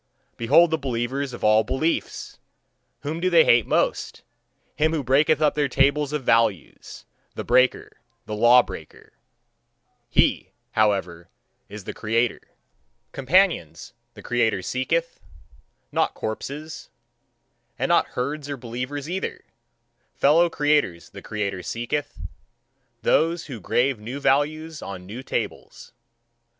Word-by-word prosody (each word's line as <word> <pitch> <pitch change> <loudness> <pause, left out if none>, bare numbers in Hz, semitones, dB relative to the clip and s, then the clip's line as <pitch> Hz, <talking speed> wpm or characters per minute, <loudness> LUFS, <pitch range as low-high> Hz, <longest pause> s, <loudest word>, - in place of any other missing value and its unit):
Behold 150 +9 +4
the 160 - 0
believers 130 +1 -2
of 120 - -9
all 110 +1 +5
beliefs! 155 +8 -2 0.6
Whom 150 +4 -4
do 185 +2 +1
they 170 -2 +6
hate 120 -2 +4
most? - - -1 0.5
Him 155 +1 +1
who 155 -3 -1
breaketh 150 +4 +3
up 150 - +3
their 145 -1 +1
tables 140 +2 +2
of 150 -2 -3
values, 115 - 0 0.3
the - - -4
breaker, 130 0 +2 0.3
the 110 - -6
law 120 +3 +6
breaker - - -11 1.0
he, - - +2 0.2
however, 95 -6 0 0.4
is 105 0 -9
the - - -6
creator. 115 +2 0 0.7
Companions, 155 - +1 0.2
the - - -12
creator 115 -6 0
seeketh, 165 - -2 0.7
not - - 0
corpses 145 +8 -6 0.9
and 130 +1 -1
not 170 - +3
herds 145 +3 -4
or 140 - -4
believers 125 +4 -5
either. 185 +3 -4 0.7
Fellow 165 +5 +4
creators 145 - 0
the - - -10
creator 100 -3 -3
seeketh 120 - -4 0.8
those 165 +1 +2
who 130 -6 -7
grave 125 +6 0
new 120 +6 -6
values 155 +3 0
on 95 -2 -7
new 110 +7 -7
tables. - - -5
135 Hz, 120 wpm, -24 LUFS, 115-150 Hz, 1.0 s, they